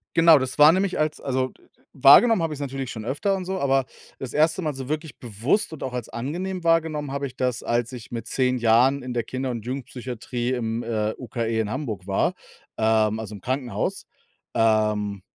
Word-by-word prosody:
Genau, 165 -1 +7
das 130 +2 -4
war 150 +2 +9
nämlich 190 -1 0
als 155 0 -1
also, 130 -1 0
d - - -24
d - - -25 0.3
wahrgenommen 170 - +7
habe 160 -2 -1
ich‘s 140 - -8
natürlich 135 -2 -4
schon 110 -2 -7
öfter 170 - 0
und 185 - -5
so, 190 +1 -3
aber 135 -1 +2 0.3
das 130 -3 -6
1. 155 +4 +2
Mal 155 -3 -2
so 130 -1 -7
wirklich 155 0 -4
bewusst 120 - -1
und 155 - -7
auch 130 - -4
als 125 -3 -4
angenehm 175 +9 -4
wahrgenommen 160 -4 +1
habe 140 0 -2
ich 125 - -13
das, 125 -2 -1
als 120 +1 0
ich 120 -2 -9
mit 115 -1 -5
10 130 -1 +1
Jahren 125 +4 +3
in 125 - -5
der 120 -1 -1
Kinder 130 +2 -3
und 115 -3 -6
Jugendpsychiatrie 125 -1 -4
im, 115 -1 -2
äh, 110 -2 -1
UKE 115 -2 -2
in 110 -2 -1
Hamburg 110 - -4
war, 95 - +1 0.4
ähm, 110 -1 +2
also 105 -1 -6
im 95 - -11
Krankenhaus. 125 -5 -2 0.5
Ähm, 105 -3 +1
130 Hz, 205 wpm, -24 LUFS, 115-150 Hz, 0.5 s, war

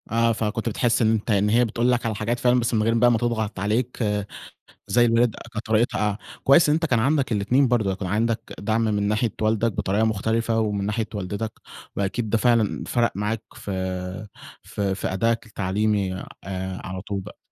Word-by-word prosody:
آه، 115 +1 +2
فكنت 115 +1 -2
بتحس 115 +2 +1
إن 110 -1 +4
أنت 110 +1 0
إن 105 0 +3
هي 120 +3 +4
بتقول 120 +2 +1
لك 120 -1 0
على 110 -2 -1
حاجات 115 +4 -2
فعلًا، 125 0 +3
بس 120 0 -1
من 110 -1 +2
غير 115 +1 +2
بقى 120 +1 +4
ما 115 - +3
تضغط 110 -4 -2
عليك 115 +5 -1 0.8
زي 120 +4 +4
الوالد، 115 0 +3 0.2
كانت 110 -1 -5
طريقتها 110 -2 +1 0.3
كويس 150 +4 +6
إن 150 - +4
أنت 165 +1 +1
كان 120 -6 +2
عندك 135 +1 +1
الاتنين 120 +6 +2
برضه، 110 -6 +1
يكون 95 -1 -4
عندك 110 +3 -1
دعم 110 +2 0
من 105 -2 0
ناحية 105 +2 0
والدك 110 +1 +1
بطريقة 100 +3 0
مُختلفة، 110 +1 0
ومن 105 -2 -1
ناحية 110 +1 -1
والدتك، 100 +2 -3 0.4
وأكيد 105 +3 -1
ده 115 - +2
فعلًا 115 -2 +2
فرق 120 -1 +1
معاك 105 +2 -2
ف 110 -3 -7 1.2
في 95 - -9
أدائك 115 +4 0
التعليمي 100 -1 -1 0.6
على 95 0 -5
طول 100 -1 -3
بقى. 95 - -11
110 Hz, 180 wpm, -24 LUFS, 105-120 Hz, 1.2 s, كويس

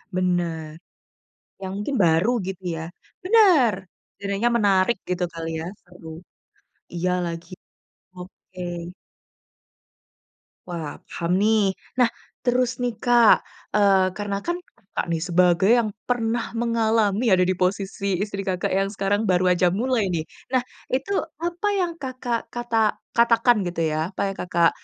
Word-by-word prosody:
Bener. 175 -4 -1 0.9
Yang 190 -1 -4
mungkin 210 +8 -3
baru 165 +5 +3 0.2
gitu 190 -1 -6
ya? 160 - -5 0.4
Bener, 365 - +5 0.5
jadinya 200 +4 0
menarik 200 +1 +3
gitu 180 0 -1
kali 165 0 -5
ya, 160 - -5 0.2
seru. 180 -2 -15 0.9
Iya 175 +1 0
lagi, 170 +1 -6 0.6
oke. 185 0 -13 2.1
Wah 165 -4 -5
paham 170 0 -3
nih 210 -2 +3 0.2
nah, 250 -2 +5 0.3
terus 245 0 +1
nih 245 -2 -1
Kak, 240 -2 +6 0.4
eee, 200 -2 +4
karena 205 -1 -2
kan 345 0 0 0.2
Kakak 205 -4 -5
nih 160 - -2
sebagai 180 +2 +3
yang 225 -3 0 0.2
pernah 235 -1 0
mengalami 225 -1 +2
ada 185 -1 +5
di 185 - +1
posisi 195 +1 -1
istri 200 0 -3
Kakak 185 -2 -2
yang 195 +1 +1
sekarang 200 +1 0
baru 180 0 +3
aja 180 0 +3
mulai 225 +1 0
nih 165 -3 -1 0.3
nah 255 -1 +2 0.3
itu 270 +10 -1 0.3
apa 345 +4 -2
yang 360 -3 0
Kakak 255 -3 -3
kata 230 -3 0 0.2
katakan 235 -1 +4
gitu 170 -1 -2
ya, 155 +3 -1
apa 195 - -8
yang - - -12
Kakak 170 -2 +2
200 Hz, 135 wpm, -23 LUFS, 180-235 Hz, 2.1 s, Kak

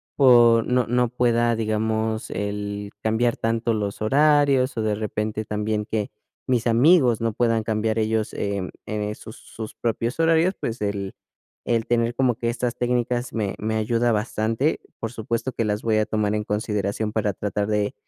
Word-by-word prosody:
por 120 -4 +6
no 125 -1 +2
no 125 0 +1
pueda, 120 -1 +2
digamos, 110 0 -1
el 100 0 -4
cambiar 115 +2 +1
tanto 115 0 0
los 105 0 -3
horarios 140 0 +3
o 110 - 0
de 110 - +1
repente 110 0 -3
también 105 0 -2
que 105 -2 -3 0.3
mis 125 -3 +1
amigos 125 0 +4
no 115 -2 0
puedan 115 -1 +1
cambiar 110 0 -1
ellos, 110 0 0
em, 100 -2 -2 0.2
eh, 105 0 -3
sus 110 - -11
sus 110 -1 -9
propios 115 +3 -2
horarios, 165 +3 +3
pues, 115 +1 -3
el 100 -2 -3 0.5
el 115 -1 0
tener 120 0 +1
como 125 -1 +2
que 115 - 0
estas 120 0 -2
técnicas 120 0 -1
me 105 -4 -1
me 110 +1 -2
ayuda 115 +2 +1
bastante. 110 +5 0 0.2
Por 115 0 -4
supuesto 115 +2 -3
que 115 - -2
las 105 -1 -2
voy 110 -1 +2
a 110 - +1
tomar 105 -1 0
en 105 - -1
consideración 105 0 -2
para 105 -3 0
tratar 105 0 -2
de, 105 -1 0
110 Hz, 170 wpm, -23 LUFS, 105-120 Hz, 0.5 s, por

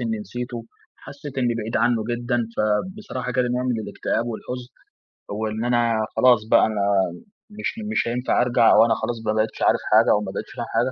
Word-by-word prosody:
إني 115 -2 -2
نسيته، 120 +3 -6 0.3
حسيت 140 -1 -9
إني 120 -2 +1
بعيد 115 0 -3
عنه 115 -1 +2
جدًا. 120 +1 -1 0.2
فبصراحة 125 - -2
جالي 125 -1 +1
نوع 125 +1 -1
من 125 -3 -1
الاكتئاب 115 +2 -2
والحزن، 125 +2 -6 0.6
وإن 110 +2 -3
أنا 115 -2 +2
خلاص 125 -2 +5
بقى - - +6
أنا 110 -2 -2 0.8
مش - - -1 0.2
مش - - 0
هينفع 125 +1 +1
أرجع 120 -2 +4
وأنا 115 0 +5
خلاص 120 +1 -3
بقى 105 - +1
ما 110 - -3
بقيتش 110 0 -1
عارف - - +3
حاجة - - +6
أو 105 - +3
ما 95 -2 -5
بقيتش - - -6
فاهم 120 - -3
حاجة. 120 +3 +2
120 Hz, 185 wpm, -23 LUFS, 110-125 Hz, 0.8 s, بقى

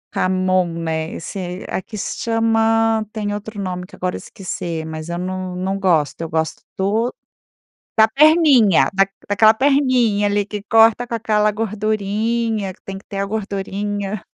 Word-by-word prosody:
jamón, 185 -2 +1
né, 160 0 -2
esse 180 +1 -6
aqui 215 +3 -5
se - - -4
chama 225 -1 +2
tem 210 -2 -3
outro 210 0 -6
nome 180 -2 -3
que - - -14
agora 180 0 -2
esqueci, 170 -4 -5
mas 160 +1 -7
eu 170 - -3
não 185 0 -4
não 190 +2 -2
gosto, 165 -5 +1
eu 165 - -4
gosto 160 0 -2 0.2
do 215 +5 0 0.9
da 220 0 +6
perninha, 280 - +5
da 195 0 +3 0.2
daquela 215 +2 +5
perninha, 255 -6 +2
ali 205 0 +1
que 205 0 -6
corta 225 +3 +4
com 235 - -5
aquela 215 -2 +1
gordurinha, 215 0 -1
que - - -30
tem 195 0 -7
que - - -18
ter 200 - -7
a 200 - 0
gordurinha, 200 -1 -3
205 Hz, 155 wpm, -20 LUFS, 185-225 Hz, 0.9 s, da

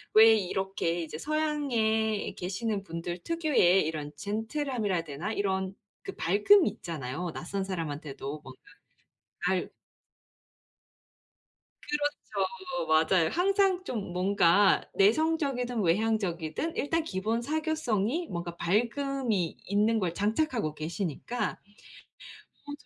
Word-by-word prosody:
왜 220 +1 +9
이렇게 190 -3 -1
이제 155 -1 -6
서양에 235 - 0
계시는 195 +3 -2
분들 175 -1 -5
특유의 290 - +3
이런 150 -2 -4
젠틀함이라 225 0 -2
해야 165 - 0
되나 150 +7 -4
이런 190 -2 -1 0.3
그 - - -6
밝음이 210 - +5
있잖아요. 160 +1 -5
낯선 195 +3 -3
사람한테도 150 -5 -5
뭔가 130 -1 -13 0.9
알 185 -1 0 2.1
그렇죠. 290 0 -2 0.4
맞아요. 160 +2 +4
항상 385 0 +2
좀 215 - -4
뭔가 190 +1 +4
내성적이든 250 - +2
외향적이든 190 - 0
일단 325 +3 0
기본 220 -1 -1
사교성이 310 - -1
뭔가 170 -1 -4
밝음이 235 - 0
있는 215 +3 +2
걸 175 -4 -1
장착하고 215 - 0
계시니까 175 - -3 1.1
어 - - -5
205 Hz, 245 characters per minute, -29 LUFS, 175-260 Hz, 2.1 s, 왜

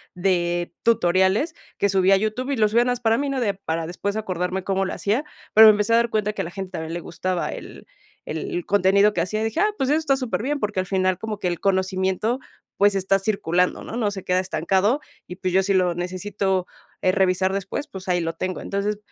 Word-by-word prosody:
de 175 -2 0
tutoriales 190 - +2 0.2
que 200 - +2
subí 190 0 +3
a 195 - +6
YouTube 220 +6 -2
y 275 - -1
lo 215 -1 +4
subía 230 +3 +3
nada 250 0 +1
más 245 - -5
para 225 -1 +3
mí, 285 0 -1
¿no?, 275 -1 -1
de 210 -5 +1
para 165 -4 -3
después 200 +5 -3
acordarme 185 -3 -2
cómo 195 0 0
lo 185 - -3
hacía, 220 +8 0 0.3
pero 220 +1 +10
me - - +10
empecé 210 +2 +1
a - - +6
dar 235 0 +2
cuenta 210 -1 0
que 205 - -3
a - - -3
la 170 - -7
gente 190 0 -6
también 160 -2 -5
le 175 - -3
gustaba 180 +1 -3
el - - -9 0.4
el 355 -3 -4
contenido 200 +1 +4
que 175 - 0
hacía, 215 +5 -2
dije: 225 0 -2
"Ah, 420 - +4
pues 265 - 0
eso 305 - +3
está 280 -4 +1
súper 255 -5 -2
bien", 285 +4 -1
porque 210 -2 -2
al 185 - -2
final 185 -1 +1
como 220 -2 -4
que 185 - -2
el 175 -1 -2
conocimiento, 190 +4 0 0.4
pues, 205 0 +4
está 195 0 +2
circulando, 180 -3 0
¿no?, 225 - -6
no 215 -4 +1
se 195 -2 -6
queda 180 0 +1
estancado, 190 - +1 0.3
y 180 - -7
pues 185 -1 -3
yo 190 - +5
si 195 0 +1
lo 180 -2 +2
necesito, 185 +1 -2 0.4
eh, 185 - +4
revisar 190 0 +2
después, 200 +8 -3
pues, 190 -7 -10
ahí 175 -1 +1
lo 165 0 -2
tengo, 185 +2 -4
entonces, 200 +1 -2
195 Hz, 235 wpm, -23 LUFS, 185-215 Hz, 0.4 s, pero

